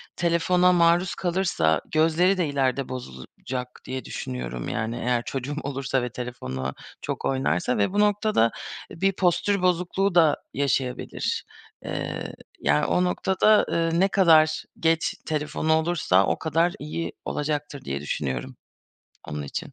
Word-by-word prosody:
telefona 175 +2 +3
maruz 170 +1 +3
kalırsa 175 - +1
gözleri 165 +4 +3
de 170 -4 +1
ileride 135 -1 0
bozulacak 125 - -6 0.2
diye 130 0 -5
düşünüyorum, 60 -1 -5
yani, 110 +2 -2
eğer 120 -1 0
çocuğum 135 +2 -4
olursa 135 -1 -1
ve 125 - -2
telefona 65 - -5 0.3
çok - - -4
oynarsa 130 -4 0
ve 105 - +1
bu 205 - +1
noktada 210 - +3 0.4
bir 195 +4 +1
postür 190 +2 +1
bozukluğu 180 +2 +1
da 160 -4 +5 0.2
yaşayabilir. 135 -2 -1 0.4
Eee, - - -4 0.3
yani, 75 +1 +2
o 180 - +2
noktada, 190 +4 +3
eee, 165 0 +1
ne 195 - +5
kadar 160 -5 +4 0.2
geç 165 0 +1
telefonu 155 +1 0
olursa 160 - +2
o - - 0
kadar 165 +2 +1
iyi 155 +3 -4
olacaktır 145 -2 -3
diye 70 +1 -3
düşünüyorum 65 -3 -3 0.7
onun 75 0 -4
için. 70 - -6
150 Hz, 130 wpm, -25 LUFS, 125-175 Hz, 0.7 s, da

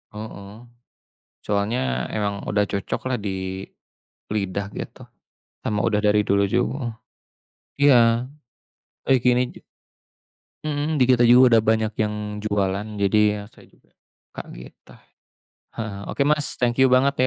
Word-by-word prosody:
heeh. 100 -2 -8 0.9
Soalnya 100 - -1
emang 100 -2 -2
udah 105 0 +2
cocok 100 -1 -3
lah 125 - 0
di 95 -2 -4 0.7
lidah 100 -1 -2
gitu, - - -8 0.6
sama 105 -2 -1
udah 105 -2 +1
dari 105 0 +4
dulu 100 0 +3
ju - - +2
heeh. 130 -4 -4 0.9
Iya 140 -3 +7 1.1
eee, 135 -1 +5
gini 125 0 +4
j - - -24 1.1
mhm 150 +1 -1
di - - +6
kita 120 -1 +4
juga 125 0 +7
udah - - +4
banyak 110 0 +1
yang 105 -1 -2
jualan 100 -1 -1
jadi 100 +1 +2 0.2
ya 105 - -6
saya - - -19
juga - - -30 0.4
kaget - - -9 0.2
tuh. - - -17 0.8
Heeh, 105 -3 -4 0.2
oke 140 - +1
Mas 150 -1 +1
thank 120 0 +1
you 130 - +6
banget 135 +2 +4
105 Hz, 135 wpm, -23 LUFS, 100-125 Hz, 1.1 s, Iya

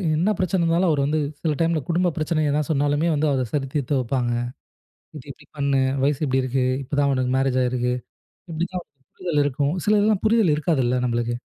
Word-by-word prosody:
என்ன 170 +7 +1
பிரச்சனை 185 0 0
இருந்தாலும், 170 +2 +2
அவர் 145 -2 +1
வந்து 155 +2 0 0.2
சில 160 -2 0
டைம்ல 165 -1 +2
குடும்பப் 175 0 +1
பிரச்சனை 155 0 0
எதா 150 +1 +1
சொன்னாலுமே 145 +2 +1
வந்து 150 +1 +1
அதைச் 130 -4 -2
சரி 140 -2 -1
தீர்த்து 140 -1 0
வைப்பாங்க. 120 -1 -1 0.8
இதை 145 - -10
இப்படி - - -20
பண்ணு. 140 -1 +1 0.2
வயசு 145 -1 +1
இப்படி 130 -1 +1
இருக்கு. 130 0 0 0.2
இப்பதான் 140 +1 +1
உனக்கு 130 -1 0
மேரேஜ் 135 -1 +1
ஆயிருக்கு. 125 0 0 0.6
இப்படி 165 +2 -2
தான் 180 -1 -4 0.3
புரிதல் 170 -5 0
இருக்கும். 145 +2 0
சிலதெல்லாம் 210 -1 +3
புரிதல் 220 -7 +4
இருக்காதுல்ல 135 -5 +1
நம்மளுக்கு. 120 0 -1
145 Hz, 180 wpm, -23 LUFS, 130-165 Hz, 0.8 s, புரிதல்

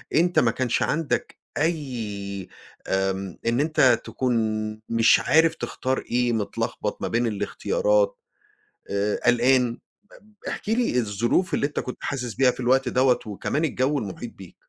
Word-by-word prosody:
أنت 175 +3 +4
ما 115 - +3
كانش 125 0 -1
عندك 160 -2 -1 0.2
أي 110 - -3 0.4
آمم 95 -1 -1
إن 115 +2 +1
أنت 135 -6 +3
تكون 130 -1 -1 0.6
مش 115 0 +5
عارف 160 +1 +3
تختار 130 +1 -2
إيه، 120 0 +2
متلخبط 110 -3 -3
ما - - -1
بين 120 +1 +1
الاختيارات، - - 0 0.7
آآ 100 +1 0
قلقان، 125 0 +3 0.5
بب 215 0 -24
احكِ - - -5
لي 225 - +2
الظروف 120 - 0
اللي 140 - +2
أنت 145 - -4
كنت 125 - -5
حاسِس 125 -5 -3
بيها 125 +5 +4
في - - -14
الوقت 130 +1 +2
دوّة 130 0 +3
وكمان 110 +9 -2
الجَو 140 0 0
المحيط 110 +2 -6
بيك؟ 95 -3 -13
125 Hz, 145 wpm, -24 LUFS, 110-150 Hz, 0.7 s, مش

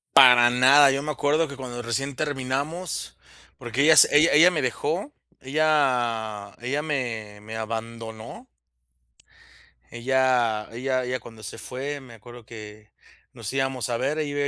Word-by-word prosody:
Para 125 -3 +8
nada, 135 +3 +6
yo 135 +1 -1
me 150 - -6
acuerdo 150 +3 0
que 140 - -9
cuando 120 -2 -7
recién 135 +4 -3
terminamos, 145 +5 -4 0.4
porque 120 +3 -3
ella 160 +1 +7
s 145 - +8
ella 155 +3 +5
ella 165 +5 +6
me 160 -4 -1
dejó, 155 - -3 0.3
ella 125 -8 0
ella 140 +5 -2
me 115 -8 -4
me 110 +1 -8
abandonó. 110 0 -7 1.5
Ella 120 -3 0
ella 130 +2 -2
ella 125 +1 -3
cuando 110 -2 -14
se - - -8
fue, 140 +3 -6
me 125 -4 -14
acuerdo 120 +1 -14
que 105 -1 -12 0.4
nos 115 -4 -7
íbamos 135 -2 -2
a 120 - -1
ver, 135 +5 -2
ella 145 -1 -2
130 Hz, 145 wpm, -24 LUFS, 115-145 Hz, 1.5 s, Para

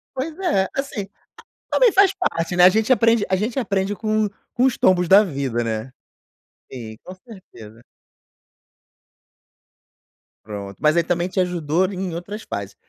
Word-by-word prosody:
Pois 305 +5 -4
é, 195 - +1
assim, 275 -8 -4 0.6
também 485 -5 +4
faz 390 0 +5
parte, 175 - -2
né, 180 - +6
a - - +10
gente 220 +6 +2
aprende 230 -2 +3
a 190 - +1
gente 220 +7 -2
aprende 200 -4 -1
com 215 0 0 0.3
com 250 - +2
os 265 - +2
tombos 180 -2 +2
da 195 +3 +8
vida, 135 - -2
né. 115 +2 -4 0.8
Sim 110 -4 -8
com 185 - -9
certeza. 150 - -15 2.6
Pronto, 100 -2 -8
mas 155 +1 +3
aí 170 - +3
também 175 +1 -1
te 185 +1 -3
ajudou 175 -1 0
em 185 -2 -4
outras 205 +5 -7
fases. 100 0 -6
185 Hz, 150 wpm, -21 LUFS, 150-220 Hz, 2.6 s, a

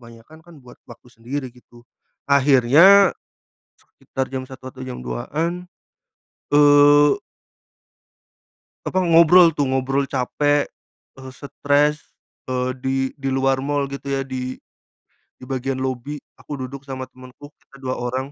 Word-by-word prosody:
kebanyakan 115 +6 -16
kan 175 - -16
buat 125 - -15
waktu - - -15
sendiri 130 +3 -6
gitu. 120 -1 -20 0.4
Akhirnya 140 +8 +5 0.7
sekitar 130 0 -6
jam 130 -1 -5
01:00 130 -1 -11
atau 130 - -10
jam 130 - -7
02:00-an 160 - -4 0.9
eee 145 0 +6 1.7
apa, 185 -1 0
ngobrol 170 +1 +6
tuh, 145 -3 -1
ngobrol 135 +1 -1
capek, 145 +2 0 0.6
eee, 130 0 -10
stres, 145 +1 0 0.5
eee 130 0 -1
di 130 +1 -2 0.2
di 135 - -3
luar 135 0 0
mal 145 +1 -1
gitu 140 0 -7
ya, 135 0 -1
di 130 -1 -5 0.9
bagian 135 0 -3
lobi. 130 +3 -4 0.2
Aku 145 - -8
duduk 135 +1 -8
sama 130 -1 -5
temanku, 130 +3 -14
kita 135 0 -20
dua 130 0 -3
orang, 130 +3 -4
135 Hz, 125 wpm, -21 LUFS, 130-145 Hz, 1.7 s, eee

